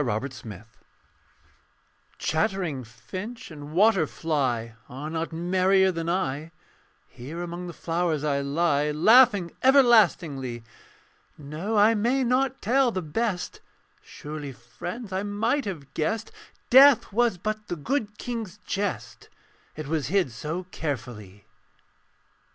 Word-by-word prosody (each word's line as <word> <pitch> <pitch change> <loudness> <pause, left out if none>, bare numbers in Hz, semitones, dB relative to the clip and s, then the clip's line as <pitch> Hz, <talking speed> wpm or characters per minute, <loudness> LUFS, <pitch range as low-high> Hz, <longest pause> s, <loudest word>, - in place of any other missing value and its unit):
THE 120 +2 -2
SKELETON 110 -4 -10 1.5
Chattering 170 -5 -1
finch 185 - -8
and 145 -1 -9
water 190 -1 +4
fly 130 -9 -1 0.2
Are 145 +5 -6
not 165 +1 -3
merrier 185 +3 +2
than 165 -1 -3
I; 155 -4 -1 0.6
Here 145 +8 -7
among 175 +1 -6
the 175 - -7
flowers 165 -3 -1
I 140 -2 0
lie 145 +1 +1
Laughing 205 - +5
everlastingly. 175 - +4 0.7
No: 155 +9 -4
I 210 +2 +6
may 240 +5 +1
not 260 +2 0
tell 255 +4 +3
the 185 -5 -3
best; 185 +4 -3 0.4
Surely, 150 -2 -8
friends, 175 - -8
I 190 - 0
might 225 +7 -1
have 145 -9 -7
guessed 220 +8 -2 0.4
Death 265 -4 +7
was 235 -3 +2
but 215 +3 -4
the - - -3
good 210 - -2
King's 225 -7 -5
jest, 200 -1 -4 0.5
It 155 - -6
was 150 -3 -1
hid 180 -4 +1
so 155 +10 -4
carefully. 105 - -6
175 Hz, 120 wpm, -26 LUFS, 145-215 Hz, 1.5 s, Death